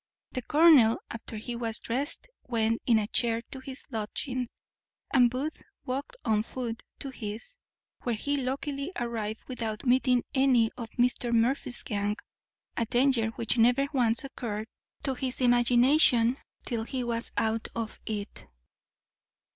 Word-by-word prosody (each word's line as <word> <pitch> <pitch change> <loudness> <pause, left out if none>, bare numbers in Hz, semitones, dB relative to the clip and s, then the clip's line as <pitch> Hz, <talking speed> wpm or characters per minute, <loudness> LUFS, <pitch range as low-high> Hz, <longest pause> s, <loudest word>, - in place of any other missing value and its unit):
The 255 - -3
colonel, 290 -6 +6
after 230 -1 -6
he 235 +3 -4
was 230 -1 -2
drest, 270 - -1 0.2
went 230 -2 +1
in 235 -3 +6
a 215 - +1
chair 230 +1 +1
to 265 - -6
his 260 0 -7
lodgings, 245 +3 -3 0.6
and 245 -3 +6
Booth 270 +6 -4 0.2
walked 270 +3 -4
on 215 -2 +3
foot 230 0 -5 0.2
to 275 - -5
his; 230 - -6 0.4
where 240 -2 -1
he 285 +7 -1
luckily 275 +3 -2
arrived 225 -5 -3
without 225 -4 -4
meeting 250 0 +3
any 260 -5 +4
of 230 -2 -6
Mr. 245 0 +2
Murphy's 240 +2 +1
gang; 205 -1 -1 0.6
a 230 - 0
danger 245 -1 +3
which 230 +1 0
never 245 +4 +5
once 240 -1 +2
occurred 225 -6 -4 0.4
to 270 - 0
his 255 0 -3
imagination 245 0 +5 0.3
till 235 -3 -2
he 250 +3 -3
was 235 -1 -3
out 225 0 0
of 230 -2 -4
it. 210 -2 -5
240 Hz, 140 wpm, -29 LUFS, 225-260 Hz, 0.6 s, colonel